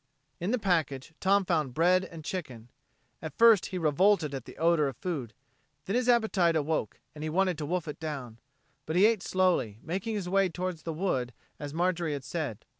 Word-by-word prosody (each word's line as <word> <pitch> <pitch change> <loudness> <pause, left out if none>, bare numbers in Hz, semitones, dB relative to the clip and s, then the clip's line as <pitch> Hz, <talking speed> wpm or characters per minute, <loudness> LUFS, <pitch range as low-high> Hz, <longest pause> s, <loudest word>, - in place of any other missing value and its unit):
In 175 - -2
the 250 - +2
package 165 - -1
Tom 195 +1 +3
found 155 -8 0
bread 180 +3 +4
and 165 -4 -10
chicken. 125 -11 -6 0.5
At 160 - -7
first 225 -4 +6
he 185 - -4
revolted 165 0 +2
at 130 -3 -5
the - - -12
odor 165 -2 +3
of 135 - -5
food, 140 -11 -4 0.5
then 195 - -2
his 250 0 +1
appetite 210 -8 +3
awoke 155 -7 -1
and 150 0 -8
he 155 - -2
wanted 185 +2 +1
to 150 - -3
wolf 175 0 -2
it 150 - -6
down. 135 -8 -6 0.5
But 160 - -2
he 190 +3 +6
ate 220 -3 +3
slowly, 180 - +1
making 195 +6 -3
his 195 -4 -3
way 195 0 +2
toward 180 0 -4
the 165 - -5
wood 130 -8 -1 0.3
as 145 -1 -5
Marjorie 170 -1 0
had 140 -2 -5
said. 150 - -4
170 Hz, 195 wpm, -29 LUFS, 150-185 Hz, 0.5 s, first